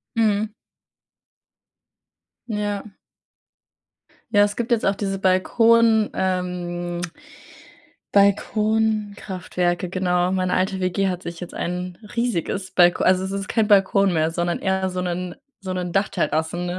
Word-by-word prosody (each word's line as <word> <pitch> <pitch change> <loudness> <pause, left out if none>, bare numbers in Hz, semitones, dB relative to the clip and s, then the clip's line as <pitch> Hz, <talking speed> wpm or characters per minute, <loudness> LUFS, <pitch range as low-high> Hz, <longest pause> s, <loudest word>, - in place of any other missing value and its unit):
Mhm. 215 -1 +1 1.9
Ja. 205 -2 -2 1.5
Ja, 205 -2 +5
es 205 0 0
gibt 235 -1 -3
jetzt 235 -2 +2
auch 195 - +3
diese 195 -1 -2
Balkon 220 +4 +3
ähm, 175 -2 -2 1.1
Balkonkraftwerke, 200 -3 +1
genau. 180 -1 +1
Meine 185 -1 0
alte 190 +1 0
WG 190 +1 0
hat 180 -1 -4
sich 170 0 -7
jetzt 180 - -8
ein 180 0 -4 0.2
riesiges 200 -5 -2
Balko 175 -1 +4
also, 185 0 +3
es 190 - -4
ist 195 0 -4
kein 220 -3 +1
Balkon 195 -1 +4
mehr, 160 0 +1
sondern 175 +1 -1
eher 190 0 0
so 180 0 -3
'nen 180 0 -3 0.3
so 190 -1 -4
'nen 180 -1 -3
Dachterrassen 170 -3 0
190 Hz, 120 wpm, -22 LUFS, 180-205 Hz, 1.9 s, Ja